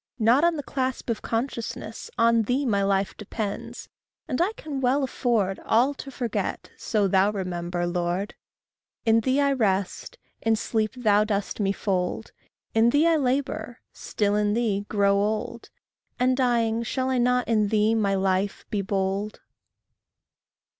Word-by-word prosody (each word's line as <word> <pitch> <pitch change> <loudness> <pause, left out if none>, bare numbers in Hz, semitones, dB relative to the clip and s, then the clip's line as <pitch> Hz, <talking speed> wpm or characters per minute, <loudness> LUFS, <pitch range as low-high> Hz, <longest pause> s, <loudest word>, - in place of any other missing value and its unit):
Not 240 +5 +4
on 340 -1 +3
the 290 - -4
clasp 260 -2 -2
Of 225 - -3
consciousness 230 -2 -4
on 230 0 +4
thee 250 +6 0
My 205 -5 +1
life 195 0 0
depends; 210 -1 -5 0.4
and 280 0 -1
I 370 +4 +2
can 290 -9 -6
well 265 +3 +2
afford 225 -7 0
All 250 +6 +3
to 275 - -9
forget, 240 -4 -3
so 210 -3 0
thou 190 +1 +3
remember, 175 -3 -3
Lord. 175 +3 -2 0.7
In 225 0 +5
thee 260 +5 +1
I 280 -1 +3
rest; 195 -6 -1 0.2
in 225 0 +2
sleep 220 +1 -1
thou 210 -4 +3
dost 205 -1 -2
me 195 -2 +1
fold; 195 +1 -2 0.4
In 225 +1 +4
thee 290 +6 +3
I 335 -1 +4
labour; 265 -3 -1
still 205 -1 -1
in 210 0 +1
thee, 205 -4 0
grow 200 -1 +3
old; 220 +3 -2 0.5
And 255 +1 +3
dying, 235 -3 +1
shall 260 +3 -1
I 255 - +1
not 250 +1 +2
in 215 -3 +2
thee, 215 +1 +2
my 205 -3 +1
Life, 190 +1 0
be 205 - 0
bold? 195 +2 -2
220 Hz, 155 wpm, -25 LUFS, 200-250 Hz, 0.7 s, In